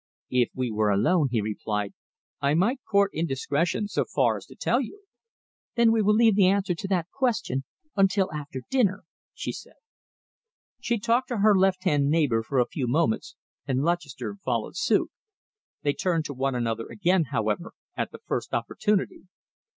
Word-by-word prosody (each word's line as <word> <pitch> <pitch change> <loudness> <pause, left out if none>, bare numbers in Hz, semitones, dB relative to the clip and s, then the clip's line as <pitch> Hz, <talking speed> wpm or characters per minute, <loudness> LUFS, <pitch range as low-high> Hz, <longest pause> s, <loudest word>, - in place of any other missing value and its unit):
"If 125 -2 +3
we 125 -2 -1
were 105 0 +1
alone," 145 - +3
he 120 -3 0
replied, 105 -1 -3 0.5
"I 140 +2 +2
might 225 - +2
court 200 -1 +3
indiscretion 165 +5 -1
so - - 0
far 120 -6 +1
as 100 - -11
to - - -14
tell 245 +3 +1
you." 395 - -8 0.7
"Then 235 -1 +5
we 225 -1 +3
will 210 +1 +4
leave 225 -1 +5
the 195 -2 +5
answer 195 -1 +2
to 175 - -5
that 180 -3 -1
question 225 - -1 0.3
until 195 -2 +2
after 145 -3 -6
dinner," 205 -7 +2 0.3
she - - -3
said. - - -11 1.0
She 240 -1 0
talked 235 +4 +1
to 240 - -2
her 210 0 +5
left 190 -1 +2
hand 145 -6 +2
neighbour 145 -8 +2
for 120 +5 -3
a 125 - +4
few 130 -1 -3
moments, 120 -3 0 0.3
and 135 0 0
Lutchester 170 +2 -2
followed - - -2
suit. - - +1 0.7
They 145 - +2
turned 165 0 0
to 145 - -4
one 135 0 -1
another 115 -2 -2
again, 185 -4 +1
however, 110 -6 -2 0.2
at - - -2
the - - -11
first - - -2
opportunity. 205 -2 -1
165 Hz, 170 wpm, -26 LUFS, 130-200 Hz, 1.0 s, Then